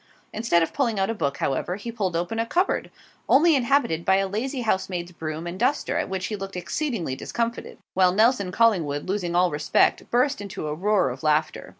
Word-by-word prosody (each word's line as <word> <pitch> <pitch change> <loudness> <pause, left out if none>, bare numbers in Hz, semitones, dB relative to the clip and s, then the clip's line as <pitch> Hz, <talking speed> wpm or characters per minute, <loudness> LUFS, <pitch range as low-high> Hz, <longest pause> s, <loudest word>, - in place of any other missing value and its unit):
Instead 210 -7 +2
of 165 - -3
pulling 235 -7 0
out 195 +3 +1
a - - -1
book, 140 -10 -2
however, 140 +6 -1
he 210 +4 -6
pulled 195 -7 -2
open 175 +7 -2
a 230 - +1
cupboard, 360 +9 0 0.4
only 315 +3 +6
inhabited 245 - +1
by 190 - +4
a 195 0 +1
lazy 250 +7 -3
housemaid's 185 -5 -1
broom 160 -1 -5
and 175 +2 -6
duster, 265 +5 0
at - - -2
which 190 0 -3
he 215 - -3
looked 195 -1 -7
exceedingly 180 - -2
discomfited; 235 - -4 0.2
while 185 -1 +4
Nelson 210 -1 +2
Collingwood, 175 -11 +1
losing 185 -3 -2
all 180 0 +3
respect, 150 +1 +1
burst 255 +1 +1
into 195 -6 -6
a 150 - -2
roar 185 -3 +1
of 130 - -8
laughter. 155 0 0
195 Hz, 200 wpm, -24 LUFS, 170-230 Hz, 0.4 s, only